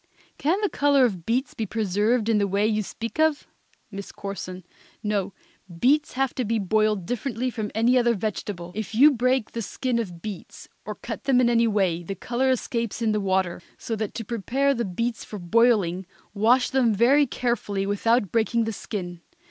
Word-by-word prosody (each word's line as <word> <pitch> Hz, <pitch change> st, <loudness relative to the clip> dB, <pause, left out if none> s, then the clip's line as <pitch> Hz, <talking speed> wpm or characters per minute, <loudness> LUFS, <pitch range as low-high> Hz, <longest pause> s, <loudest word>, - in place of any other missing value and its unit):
_ -, -, -42 dB
Can 330 Hz, +7 st, +1 dB
the 415 Hz, -, +2 dB
color 280 Hz, -2 st, +3 dB
of 185 Hz, -8 st, -3 dB
beets 250 Hz, +4 st, 0 dB
be 220 Hz, -, -3 dB
preserved 215 Hz, +3 st, +1 dB
in 225 Hz, -2 st, +3 dB
the 200 Hz, -, +1 dB
way 200 Hz, +2 st, +1 dB
you 215 Hz, 0 st, +1 dB
speak 230 Hz, +6 st, -6 dB
of? 315 Hz, -2 st, +2 dB, 0.5 s
MISS 200 Hz, 0 st, -7 dB
CORSON. 185 Hz, -2 st, -7 dB, 0.4 s
No, 205 Hz, -2 st, -1 dB, 0.5 s
beets 295 Hz, -, +3 dB
have 270 Hz, 0 st, 0 dB
to 255 Hz, -, -2 dB
be 225 Hz, 0 st, 0 dB
boiled 215 Hz, -1 st, +1 dB
differently 245 Hz, +1 st, -2 dB
from 220 Hz, -3 st, -4 dB
any 240 Hz, +3 st, +4 dB
other 235 Hz, -1 st, +2 dB
vegetable. 190 Hz, -3 st, -4 dB
If 215 Hz, +1 st, -5 dB
you 285 Hz, +6 st, +7 dB
break 255 Hz, -2 st, +1 dB
the 230 Hz, -, -4 dB
skin 245 Hz, +2 st, -2 dB
of 175 Hz, -7 st, -6 dB
beets, 205 Hz, -5 st, -8 dB, 0.2 s
or -, -, -5 dB
cut -, -, -7 dB
them 265 Hz, -2 st, +4 dB
in 240 Hz, -1 st, +4 dB
any 230 Hz, 0 st, +3 dB
way, 190 Hz, -6 st, +1 dB
the 195 Hz, +3 st, -5 dB
color 245 Hz, +7 st, -1 dB
escapes 235 Hz, -2 st, -1 dB
in 220 Hz, -, +2 dB
the 210 Hz, -1 st, 0 dB
water. 190 Hz, -2 st, 0 dB, 0.2 s
So 225 Hz, -, -4 dB
that 215 Hz, -1 st, -4 dB
to 225 Hz, -, -5 dB
prepare 250 Hz, +6 st, 0 dB
the 235 Hz, -3 st, -2 dB
beets 230 Hz, +5 st, -3 dB
for 210 Hz, -, -8 dB
boiling, 195 Hz, -2 st, +2 dB, 0.3 s
wash 235 Hz, +5 st, +3 dB
them 245 Hz, -5 st, +3 dB
very 270 Hz, +7 st, +4 dB
carefully 215 Hz, -6 st, -1 dB
without 205 Hz, +1 st, +1 dB
breaking 230 Hz, 0 st, +1 dB
the 225 Hz, 0 st, -3 dB
skin. 175 Hz, -4 st, -6 dB
225 Hz, 190 wpm, -25 LUFS, 200-245 Hz, 0.5 s, you